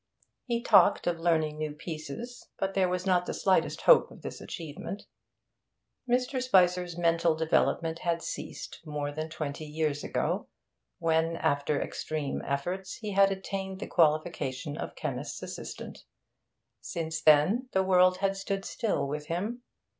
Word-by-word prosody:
He 235 Hz, -1 st, -1 dB
talked 205 Hz, -2 st, +5 dB
of 170 Hz, -1 st, 0 dB
learning 160 Hz, -2 st, +1 dB
new 155 Hz, -1 st, -2 dB
pieces, 160 Hz, -, -7 dB
but 195 Hz, 0 st, -1 dB
there 190 Hz, -2 st, +2 dB
was 180 Hz, +1 st, -2 dB
not 180 Hz, -2 st, +2 dB
the -, -, -2 dB
slightest 190 Hz, -1 st, +2 dB
hope -, -, +6 dB
of -, -, -15 dB
this -, -, -6 dB
achievement. 170 Hz, +5 st, -6 dB, 1.1 s
Mr. 250 Hz, +1 st, +1 dB
Spicer's 180 Hz, -7 st, +3 dB
mental 170 Hz, -1 st, +3 dB
development 160 Hz, +1 st, +1 dB
had 170 Hz, -1 st, -1 dB
ceased -, -, -6 dB
more 150 Hz, -2 st, -3 dB
than 155 Hz, +2 st, -4 dB
twenty 155 Hz, -1 st, -5 dB
years 150 Hz, -1 st, -1 dB
ago, -, -, -1 dB, 0.5 s
when, 165 Hz, 0 st, +1 dB
after 145 Hz, -1 st, +1 dB
extreme 150 Hz, -3 st, -3 dB
efforts, 180 Hz, +8 st, -2 dB
he 215 Hz, -2 st, -5 dB
had 195 Hz, 0 st, +5 dB
attained 190 Hz, 0 st, -4 dB
the -, -, -4 dB
qualification 150 Hz, -4 st, +1 dB
of -, -, -6 dB
chemist's -, -, -4 dB
assistant. -, -, -7 dB, 0.8 s
Since 160 Hz, -1 st, -4 dB
then 180 Hz, -, +4 dB
the 190 Hz, -, +2 dB
world 185 Hz, -1 st, +5 dB
had 195 Hz, 0 st, 0 dB
stood 195 Hz, 0 st, -3 dB
still 220 Hz, -, -1 dB
with 150 Hz, +1 st, -4 dB
him. 205 Hz, +9 st, -3 dB
170 Hz, 145 wpm, -29 LUFS, 155-195 Hz, 1.1 s, hope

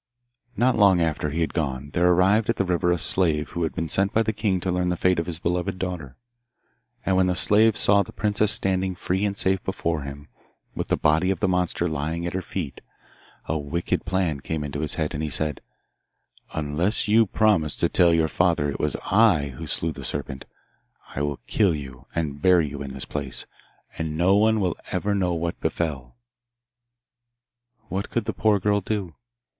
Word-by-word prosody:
Not 125 Hz, +2 st, +3 dB
long 100 Hz, -4 st, +5 dB
after 80 Hz, -2 st, 0 dB
he 80 Hz, +4 st, -2 dB
had 80 Hz, -, -1 dB
gone 70 Hz, -3 st, -3 dB
there 85 Hz, +3 st, +2 dB
arrived 95 Hz, +5 st, +3 dB
at 115 Hz, -, +2 dB
the 100 Hz, -, 0 dB
river 90 Hz, 0 st, +1 dB
a 90 Hz, -, +2 dB
slave 80 Hz, -3 st, +1 dB
who 85 Hz, -, -4 dB
had 80 Hz, -, -2 dB
been 80 Hz, -, -2 dB
sent 95 Hz, +5 st, +1 dB
by 115 Hz, -, +2 dB
the 110 Hz, 0 st, -1 dB
king 100 Hz, -3 st, 0 dB
to 95 Hz, -, -1 dB
learn 90 Hz, 0 st, 0 dB
the 90 Hz, -, -1 dB
fate 90 Hz, -1 st, +2 dB
of 85 Hz, -, -3 dB
his 85 Hz, -3 st, -3 dB
beloved 90 Hz, +3 st, -2 dB
daughter. 90 Hz, -8 st, -5 dB, 0.9 s
And 95 Hz, -, +2 dB
when 95 Hz, 0 st, +3 dB
the 90 Hz, -, +1 dB
slave 110 Hz, +3 st, +4 dB
saw 100 Hz, 0 st, +5 dB
the 100 Hz, -, -6 dB
princess 105 Hz, +1 st, +1 dB
standing 95 Hz, -1 st, +1 dB
free 95 Hz, +2 st, -2 dB
and 100 Hz, -1 st, -2 dB
safe 95 Hz, 0 st, +1 dB
before 85 Hz, -4 st, -2 dB
him, 70 Hz, +1 st, -8 dB, 0.5 s
with -, -, -4 dB
the -, -, +1 dB
body 80 Hz, +5 st, +2 dB
of 95 Hz, -, 0 dB
the 105 Hz, -, +1 dB
monster 90 Hz, -1 st, 0 dB
lying 80 Hz, +2 st, -3 dB
at 85 Hz, -, -3 dB
her 95 Hz, -, -2 dB
feet, 80 Hz, -5 st, -5 dB, 0.6 s
a 80 Hz, 0 st, -1 dB
wicked 75 Hz, +4 st, -2 dB
plan 90 Hz, -6 st, -1 dB
came 80 Hz, +2 st, -4 dB
into 75 Hz, 0 st, -5 dB
his 75 Hz, -1 st, -1 dB
head, 80 Hz, 0 st, -2 dB
and 75 Hz, -, -3 dB
he 80 Hz, -, -2 dB
said, 75 Hz, +1 st, -1 dB, 0.9 s
'Unless 80 Hz, +9 st, 0 dB
you 110 Hz, +1 st, +4 dB
promise 95 Hz, -8 st, +2 dB
to -, -, +1 dB
tell 85 Hz, -1 st, +4 dB
your 80 Hz, -1 st, +3 dB
father 80 Hz, -4 st, +1 dB
it -, -, -6 dB
was -, -, 0 dB, 0.2 s
I 95 Hz, -9 st, +4 dB
who 65 Hz, -, -8 dB
slew 80 Hz, -, 0 dB
the -, -, -9 dB
serpent, 65 Hz, 0 st, -3 dB, 0.7 s
I 70 Hz, -, -2 dB
will 75 Hz, -1 st, -2 dB
kill 95 Hz, -6 st, +2 dB
you 65 Hz, -4 st, -9 dB
and 75 Hz, -4 st, -3 dB
bury 90 Hz, -3 st, +4 dB
you 70 Hz, 0 st, -7 dB
in 70 Hz, -2 st, -6 dB
this 65 Hz, -, -5 dB
place, 70 Hz, -3 st, -5 dB, 0.5 s
and 80 Hz, -1 st, -3 dB
no 90 Hz, +4 st, +4 dB
one 110 Hz, +1 st, +3 dB
will 90 Hz, -3 st, 0 dB
ever 100 Hz, +3 st, -1 dB
know 90 Hz, -3 st, 0 dB
what 85 Hz, 0 st, -3 dB
befell.' 65 Hz, -8 st, -3 dB, 1.7 s
What 95 Hz, +2 st, -3 dB
could 120 Hz, -3 st, -2 dB
the -, -, -2 dB
poor 105 Hz, -2 st, +2 dB
girl 100 Hz, +2 st, +1 dB
do? 100 Hz, -4 st, -3 dB
85 Hz, 200 wpm, -24 LUFS, 75-95 Hz, 1.7 s, long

